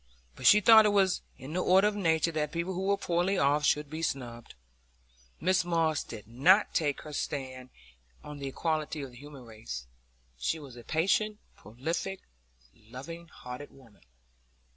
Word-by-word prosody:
But 130 - 0
she 210 - +8
thought 220 0 +8
it 205 - +1
was 190 -2 +3 0.2
in 135 +4 -9
the 180 - 0
order 190 +3 +5
of 210 - -1
nature 165 -4 +1
that 150 -2 -2
people 170 +2 -2
who 190 +2 -3
were 200 0 +2
poorly 175 +3 0
off 145 0 +2
should 150 0 +2
be 155 +3 -6
snubbed. 120 -6 -4 0.8
Mrs 185 +1 +2
Moss 165 -3 +1
did 105 -3 -10
not 165 - +4
take 145 -4 0
her 150 - -9
stand 130 -4 -4 0.5
on 150 -1 -9
the 140 - -4
equality 155 +1 -2
of 135 - -8
the 120 - -15
human 140 -1 -12
race; 110 - -8 0.5
she 110 - -1
was 140 -5 -11
a 120 - -11
patient, 195 - +1 0.2
prolific, 160 - -4 0.5
loving 135 +10 -10
hearted 125 -1 -9
woman. 120 -6 -20
155 Hz, 165 wpm, -30 LUFS, 130-180 Hz, 0.8 s, she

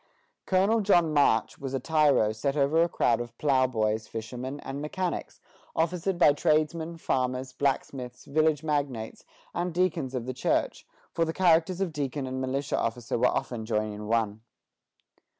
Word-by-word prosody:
Colonel 195 +4 +3
John 175 -6 +3
March 140 -7 +2
was 135 -1 -4
a - - 0
tyro 145 -6 +3
set 135 +7 -2
over 145 +3 +3
a 170 - +3
crowd 120 -7 +1
of 120 0 -8
ploughboys, 120 -6 +1
fishermen, 125 +5 -6
and 135 +1 -6
mechanics, 175 +4 -3 0.4
officered 175 +3 0
by 150 -4 +6
tradesmen, 160 +2 0
farmers, 130 -3 -1
blacksmiths, 130 -2 -2
village 155 0 +1
magnates, 140 -7 -2 0.3
and 175 +1 -1
deacons 165 -6 0
of 120 -2 -3
the 130 - -3
church, - - -1 0.3
for 165 - +1
the 160 0 -1
characters 175 +1 +3
of 180 -4 -1
deacon 140 -1 -3
and 130 0 -4
militia 135 +2 -1
officer 115 0 -2
were 125 - +4
often 120 -3 -2
joined 110 -1 -1
in 105 0 -7
one. 110 -1 0
140 Hz, 155 wpm, -28 LUFS, 125-160 Hz, 0.4 s, by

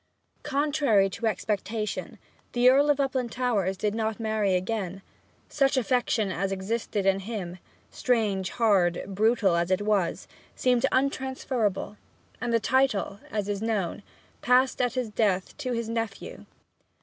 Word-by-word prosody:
Contrary 280 -9 +2
to 225 +4 -2
expectation, 210 +1 -3 0.4
the 245 0 +4
Earl 285 +3 +4
of 290 - +4
Uplandtowers 245 -7 0
did 205 +1 -1
not 220 0 -2
marry 215 -4 +1
again. 190 0 -3 0.4
Such 275 -1 +1
affection 240 -5 +1
as 195 +2 -2
existed 200 +1 -2
in 195 0 +3
him 190 -4 -6 0.3
strange, 205 -6 0
hard, 195 -7 +2
brutal 205 -1 +2
as 170 +1 0
it 185 +2 +1
was 200 -5 0 0.3
seemed 250 +1 +2
untransferable, 260 -6 -1 0.4
and 240 0 -1
the 230 - +3
title, 235 -5 +1
as 210 -2 -2
is 205 -1 -2
known, 210 -4 -1 0.4
passed 255 +2 +3
at 245 +1 0
his 250 -4 -2
death 195 -4 0
to 255 - -3
his 230 -1 -2
nephew. 225 -3 -5
220 Hz, 135 wpm, -27 LUFS, 195-250 Hz, 0.4 s, the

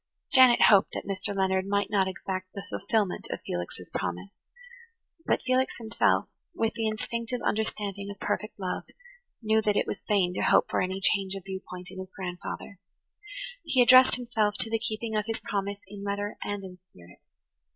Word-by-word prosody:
Janet 255 -2 +7
hoped 200 -1 +6
that - - -4
Mr. 200 +1 -1
Leonard 190 0 +1
might 200 +1 0
not 195 -2 +3
exact 185 0 -5
the 200 0 -6
fulfillment 200 -1 -1
of - - -3
Felix's 90 0 -5
promise; 90 +2 -3 1.0
but - - +1
Felix 255 0 +1
himself, 225 -1 +1 0.3
with 225 0 0
the 225 -2 -1
instinctive 235 +2 -3
understanding 205 -2 -2
of 200 0 -8
perfect 210 0 -3
love, 185 -2 -3 0.6
knew 220 0 +3
that 210 -1 +1
it - - +2
was - - -5
vain 190 -4 +2
to - - -2
hope - - +4
for - - +1
any 185 +1 -1
change 195 -1 +2
of 195 - -7
viewpoint 185 -1 -7
in 190 - -9
his 185 0 -9
grandfather. 180 +1 -6 0.8
He 260 - 0
addressed 255 +1 +8
himself 225 -4 0
to 225 - 0
the 225 - +1
keeping 220 0 -3
of 210 0 0
his 225 - -2
promise 200 0 -3
in 200 0 -9
letter 205 +1 -2
and 205 -1 -3
in 180 -1 -10
spirit. 90 - -19
200 Hz, 175 wpm, -28 LUFS, 190-220 Hz, 1.0 s, addressed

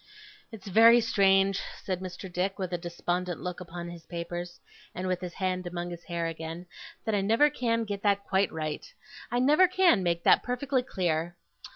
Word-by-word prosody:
'It's 220 -4 -11
very 230 +4 +7
strange,' 195 -3 +3 0.2
said 185 -2 -2
Mr. 185 +1 -7
Dick, 185 +2 -2
with 185 -2 -4
a - - +1
despondent 175 +1 -3
look 180 -1 -5
upon 175 -1 -7
his 170 -1 -10
papers, 175 0 -6 0.4
and 185 +1 -3
with 185 0 -1
his 180 -1 -6
hand 185 -1 -2
among 175 0 -4
his 170 -1 -9
hair 170 -1 -2
again, 165 +1 -5 0.4
'that 220 - -1
I 205 - +2
never 230 +9 +4
can 230 -4 0
get 205 -2 -5
that 200 -1 +2
quite 195 -1 +1
right. 155 - -5 0.4
I 240 - -1
never 300 +9 +5
can 365 - +4
make 170 -1 0
that - - +5
perfectly 255 +1 -1
clear. 175 -7 -2
185 Hz, 185 wpm, -28 LUFS, 175-220 Hz, 0.4 s, very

